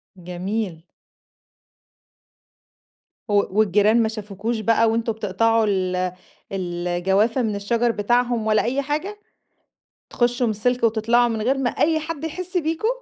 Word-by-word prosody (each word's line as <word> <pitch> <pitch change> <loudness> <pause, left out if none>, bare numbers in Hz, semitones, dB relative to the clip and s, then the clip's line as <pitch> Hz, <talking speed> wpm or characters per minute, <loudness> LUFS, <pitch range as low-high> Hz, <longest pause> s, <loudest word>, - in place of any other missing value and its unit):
جميل. 180 0 -4 2.5
و - - 0 0.3
والجيران 210 +3 +4
ما - - +1
شافكوش 215 +1 -4
بقى 225 +1 +3
وأنتم 225 0 0
بتقطعوا 220 +2 +1
ال 185 -3 0 0.6
ال 175 -2 -3
الجوافة 195 +8 +1
من 215 -3 -1
الشجر 230 +4 0
بتاعهم 240 +1 0
ولا 215 -1 +3
أي 265 +4 0
حاجة؟ 310 +9 -3 0.9
تخشوا 245 0 +1
من - - +1
السلك 245 +4 -1
وتطلعوا، 230 +2 +3
من 225 -2 -2
غير 260 +5 +1
ما 265 -2 0
أي 315 +4 +1
حد 315 -1 -6
يحس 365 +3 -4
بيكم؟ 325 +5 -1
225 Hz, 130 wpm, -22 LUFS, 205-245 Hz, 2.5 s, والجيران